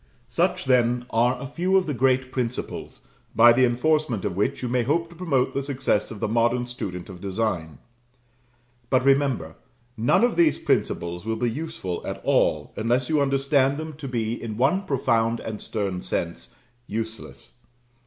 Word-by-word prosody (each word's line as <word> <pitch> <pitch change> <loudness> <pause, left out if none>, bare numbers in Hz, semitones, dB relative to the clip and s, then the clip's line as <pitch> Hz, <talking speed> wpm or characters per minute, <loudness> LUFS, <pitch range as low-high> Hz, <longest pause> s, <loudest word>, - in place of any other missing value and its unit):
Such, - - 0
then, 125 -1 +2
are 120 +2 +2
a 140 - -6
few 180 +7 +1
of 190 - +2
the 150 - -2
great 130 0 +1
principles, 125 -1 -4 0.3
by 120 +1 +8
the 130 +2 +4
enforcement 125 -2 +1
of - - -2
which 100 +5 -1
you - - -1
may 125 +1 +1
hope 165 +7 0
to - - -13
promote 155 -8 0
the 140 - -1
success 135 -6 0
of 110 - -8
the - - -1
modern 120 +2 +1
student 90 -7 -6
of 90 -3 -10
design; 95 -6 -2 1.1
but 130 -1 +2
remember, 135 - +2 0.4
none 120 - +3
of 240 -7 +2
these 165 -3 +4
principles 85 0 -1
will 110 +1 -2
be 115 +1 0
useful 145 - -5
at - - -5
all, - - +2
unless 120 +3 0
you 155 -2 +2
understand 135 0 +2
them 155 0 -5
to 145 - -6
be, 115 -3 -1
in 110 -2 -5
one 175 - +2
profound 115 -5 +1
and 105 -2 -6
stern 100 -5 -3
sense, 85 0 -4 0.3
useless. 110 +1 -6
125 Hz, 170 wpm, -24 LUFS, 110-140 Hz, 1.1 s, by